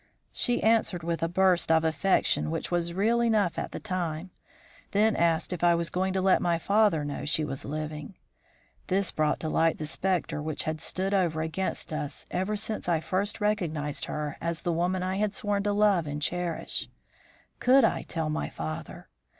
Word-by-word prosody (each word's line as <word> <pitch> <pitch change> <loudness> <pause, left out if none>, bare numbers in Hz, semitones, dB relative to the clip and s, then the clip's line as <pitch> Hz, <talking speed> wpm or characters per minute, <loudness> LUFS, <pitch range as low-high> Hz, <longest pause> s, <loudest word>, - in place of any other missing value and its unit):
"She 245 -1 0
answered 220 -6 +2
with 170 0 -2
a 165 - +2
burst 185 -1 +3
of 160 0 +4
affection 160 +1 +1
which 165 +2 -3
was 170 -1 0
real 225 +5 +2
enough 215 -6 +2
at - - -4
the - - -5
time; 180 -3 -3 0.6
then 215 +2 +3
asked 170 +1 +1
if 175 - -5
I 170 -1 +5
was 170 0 -2
going 190 +1 0
to 190 - 0
let 190 -1 +4
my 170 -1 +2
father 200 -4 +2
know 145 - -4
she 155 +1 +1
was 135 -2 -5
living. 155 +3 -5 0.7
This 195 +1 +1
brought 155 -1 +1
to 160 - -2
light 160 +1 +2
the 155 - -4
spectre 175 -1 -1
which 155 -1 0
had 155 0 -3
stood 190 +2 -1
over 170 -5 +1
against 160 0 -2
us 150 -2 -4
ever 190 +4 -1
since 210 -2 -2
I 165 -2 +3
first 200 +6 -1
recognised 160 -9 -1
her 150 -1 -4
as 170 0 -2
the 175 - 0
woman 180 +2 0
I 185 +1 -1
had 210 0 0
sworn 205 -5 0
to 205 - +2
love 205 -5 +3
and 145 0 -3
cherish. 175 +2 -2 0.7
Could 265 +1 +5
I - - +2
tell 160 -3 -3
my 155 - -2
father? 80 0 -6
175 Hz, 190 wpm, -28 LUFS, 160-195 Hz, 0.7 s, I